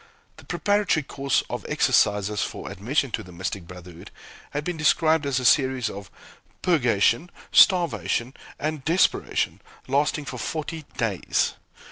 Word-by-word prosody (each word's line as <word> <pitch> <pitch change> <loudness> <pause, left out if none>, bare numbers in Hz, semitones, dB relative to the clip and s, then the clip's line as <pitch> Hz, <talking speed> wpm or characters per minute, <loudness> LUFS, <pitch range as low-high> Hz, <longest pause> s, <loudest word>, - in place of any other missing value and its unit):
The - - -14
preparatory 205 -6 +1
course 140 0 0
of - - -5
exercises 105 0 +2
for - - -5
admission 130 +7 -1
to - - -2
the 90 - -12
mystic 90 0 -5
brotherhood 90 -1 -11 0.4
has 145 - -3
been 180 +2 -3
described 155 0 +2
as 135 -2 +1
a 125 - -4
series 130 -3 +3
of 100 -1 -9 0.5
"purgation, 125 - +2 0.2
starvation, 170 - +3 0.2
and 155 -1 -3
desperation," 170 +6 +1 0.3
lasting 145 +2 0
for 125 -3 -6
forty 155 +3 -4
days! 105 -7 0
135 Hz, 130 wpm, -24 LUFS, 105-155 Hz, 0.5 s, series